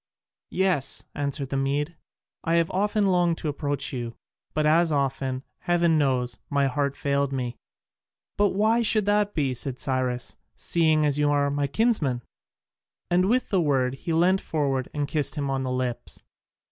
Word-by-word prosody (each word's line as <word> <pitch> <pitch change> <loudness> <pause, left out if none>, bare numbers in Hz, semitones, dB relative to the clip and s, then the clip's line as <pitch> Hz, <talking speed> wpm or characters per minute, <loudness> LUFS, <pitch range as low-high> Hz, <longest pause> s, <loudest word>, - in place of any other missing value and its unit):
"Yes," 185 -8 0
answered 140 -1 -2
the 135 - -1
Mede, 145 +4 -1 0.5
"I 165 - +1
have 170 -1 +2
often 205 +2 +1
longed 175 -3 +2
to 155 - -3
approach 145 -2 -2
you, 120 -2 -4 0.4
but 155 0 +1
as 165 +2 +4
often, 135 -2 -1 0.2
heaven 170 -2 +2
knows, 125 -4 0
my 140 -1 +2
heart 140 +1 0
failed 140 -1 0
me." 125 -3 -3 0.8
"But 205 -2 +2
why 220 +3 +3
should 215 -2 +2
that 205 0 +2
be," 140 -5 +1
said 125 +1 -5
Cyrus, 130 -2 -2 0.2
"seeing 160 -2 +2
you 150 0 +2
are 145 -1 +2
my 145 0 0
kinsman?" 145 - +1 0.9
And 180 +2 +3
with 250 +2 +1
the 190 -3 +2
word, 135 -5 +1
he 135 +5 -5
leant 180 +4 +3
forward 135 -4 -1
and 145 -1 -2
kissed 150 -1 -1
him 140 -2 -2
on 135 0 -1
the 130 -1 -2
lips. 125 -2 -4
145 Hz, 160 wpm, -25 LUFS, 135-175 Hz, 0.9 s, as